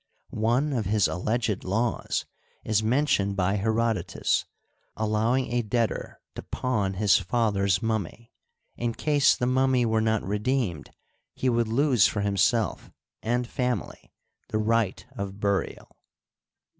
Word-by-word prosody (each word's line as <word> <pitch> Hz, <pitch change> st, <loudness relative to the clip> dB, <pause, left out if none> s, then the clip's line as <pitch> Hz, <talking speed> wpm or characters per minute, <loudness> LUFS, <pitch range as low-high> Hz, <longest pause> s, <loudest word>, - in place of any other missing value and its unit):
One 135 Hz, +5 st, +2 dB
of 115 Hz, -5 st, -1 dB
his 105 Hz, 0 st, +2 dB
alleged 110 Hz, +3 st, -1 dB
laws 110 Hz, +5 st, -1 dB, 0.4 s
is 110 Hz, -1 st, +1 dB
mentioned 110 Hz, -4 st, +1 dB
by 95 Hz, +1 st, +1 dB
Herodotus: 110 Hz, -4 st, 0 dB, 0.5 s
al 110 Hz, 0 st, -1 dB
lowing 115 Hz, +4 st, +1 dB
a 120 Hz, -, +2 dB
debtor 115 Hz, +1 st, -2 dB
to -, -, -7 dB
pawn 105 Hz, -7 st, -2 dB
his 100 Hz, -1 st, +4 dB
father's 100 Hz, 0 st, +1 dB
mummy; 110 Hz, +1 st, -3 dB, 0.4 s
in 120 Hz, -1 st, -2 dB
case 145 Hz, -2 st, +3 dB
the 125 Hz, -, 0 dB
mummy 130 Hz, -1 st, +2 dB
were 110 Hz, -1 st, +1 dB
not 110 Hz, -1 st, +1 dB
redeemed, 105 Hz, -, -1 dB, 0.5 s
he 130 Hz, -, 0 dB
would 120 Hz, -1 st, +1 dB
lose 125 Hz, 0 st, +3 dB
for 100 Hz, -, -2 dB
himself 105 Hz, +3 st, +1 dB, 0.3 s
and 120 Hz, +2 st, 0 dB
family 125 Hz, -, -3 dB, 0.4 s
the 110 Hz, -, -2 dB
right 110 Hz, -2 st, 0 dB
of 100 Hz, 0 st, -6 dB
burial. 100 Hz, -1 st, -2 dB
110 Hz, 130 wpm, -26 LUFS, 100-120 Hz, 0.5 s, his